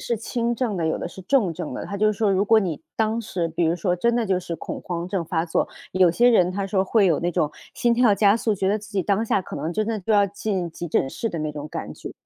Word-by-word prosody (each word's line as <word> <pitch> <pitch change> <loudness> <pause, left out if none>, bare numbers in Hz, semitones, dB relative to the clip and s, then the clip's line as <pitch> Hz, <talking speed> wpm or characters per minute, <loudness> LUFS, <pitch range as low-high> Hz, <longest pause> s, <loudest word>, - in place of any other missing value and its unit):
是 235 - -1
轻 235 +2 -2
症 235 -4 -1
的， 170 - -1
有 160 - 0
的 - - -4
是 190 - -11
重 195 -4 +2
症 165 -4 -5
的。 125 - -5
他 200 - -5
就 215 +1 +3
说： 205 -1 +1
“如 190 +2 +2
果 225 +2 +5
你 170 -7 -2
当 220 +1 +1
时 185 -6 -2
比 165 +1 -1
如 165 +2 +1
说 180 0 0
真 235 +7 +1
的 235 -2 0
就 190 -2 +1
是 170 -2 -5
恐 - - -6
慌 175 -1 -4
症 185 -2 -2
发 165 0 -1
作， 165 - 0 0.2
有 185 -1 +5
些 240 +8 +4
人 185 -7 +4
“他 195 +1 -2
说： 195 -1 +1
“会 200 0 +3
有 165 - +2
那 175 - 0
种 170 -3 +1 0.2
心 240 -1 +2
跳 240 -2 +4
加 200 +1 +4
速， 225 -1 0
觉 195 -2 -1
得 200 +2 +2
自 215 -1 -10
己 200 -2 0
当 200 +4 +1
下 205 - +1
可 - - -9
能 155 +4 -3
真 215 +4 -1
的 220 -2 -2
就 205 +4 -1
要 205 -1 +5
进 200 -2 -3
急 175 +1 -6
诊 135 - +1
室 230 - -3
的 170 - -5
那 155 -1 -3
种 150 0 -6
感 - - -6
觉。” - - -8
195 Hz, 315 characters per minute, -23 LUFS, 175-220 Hz, 0.2 s, 果